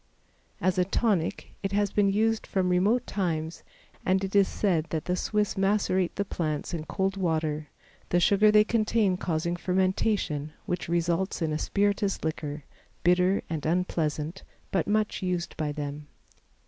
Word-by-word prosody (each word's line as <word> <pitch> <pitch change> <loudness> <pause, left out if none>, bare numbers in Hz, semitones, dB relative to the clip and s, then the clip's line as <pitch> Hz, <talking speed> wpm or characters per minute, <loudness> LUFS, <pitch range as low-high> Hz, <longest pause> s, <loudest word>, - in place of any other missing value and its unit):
As 185 -1 +1
a - - +5
tonic, 195 -2 0
it 195 -1 -3
has 205 -1 +1
been 205 -1 +3
used 220 +2 +1
from 185 -2 0
remote 205 +8 +2
times 165 -4 -2 0.4
and 190 +1 +2
it 195 +1 -3
is 200 -1 +6
said 170 -6 0
that 160 -2 -3
the 180 - 0
Swiss 210 +2 0
macerate 195 -2 +1
the 200 - -1
plants 155 -3 -3
in 160 -2 -3
cold 195 +2 -1
water, 155 -4 -1 0.4
the 175 - +3
sugar 200 +4 +5
they 210 0 +6
contain 215 -3 +2
causing 170 -1 -1
fermentation 185 -4 0
which 180 -4 -3
results 170 +2 0
in 155 -1 0
a 155 - -1
spirituous 200 +1 0
liquor, 150 -2 -3 0.4
bitter 180 +2 +3
and 160 -3 -4
unpleasant, 165 -1 -1 0.3
but 190 -4 0
much 215 +1 0
used 180 -2 -2
by 155 -2 -2
them. 145 0 -5
180 Hz, 155 wpm, -27 LUFS, 160-200 Hz, 0.4 s, is